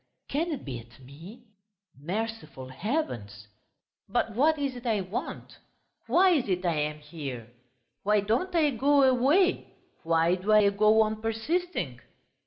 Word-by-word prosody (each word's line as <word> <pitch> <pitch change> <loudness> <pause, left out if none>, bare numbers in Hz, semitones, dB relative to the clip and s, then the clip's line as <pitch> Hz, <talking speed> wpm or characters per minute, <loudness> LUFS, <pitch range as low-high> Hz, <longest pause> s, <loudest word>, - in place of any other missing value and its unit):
Can 330 +4 -1
it 290 - -5
be 130 -4 -5
at 115 +1 -16
me, 165 - -13 0.5
merciful 170 -4 -5
heavens! 130 - -4 0.6
But 225 - 0
what 305 +7 +3
is 280 -3 -2
it 245 0 -7
I 215 -3 +1
want... 185 +4 -6 0.5
why 370 +1 +5
is 280 - +1
it 180 0 -1
I 170 - +2
am 150 0 -2
here, 140 -6 -8 0.5
why 210 0 +2
don't 235 - -1
I 305 -3 +3
go 280 +3 +3
away, 275 +9 +2 0.3
why 165 +1 +2
do 190 +4 0
I 210 -1 +6
go 215 +2 +4
on 215 0 -3
persisting?"... 225 - -2
215 Hz, 145 wpm, -27 LUFS, -, 0.6 s, I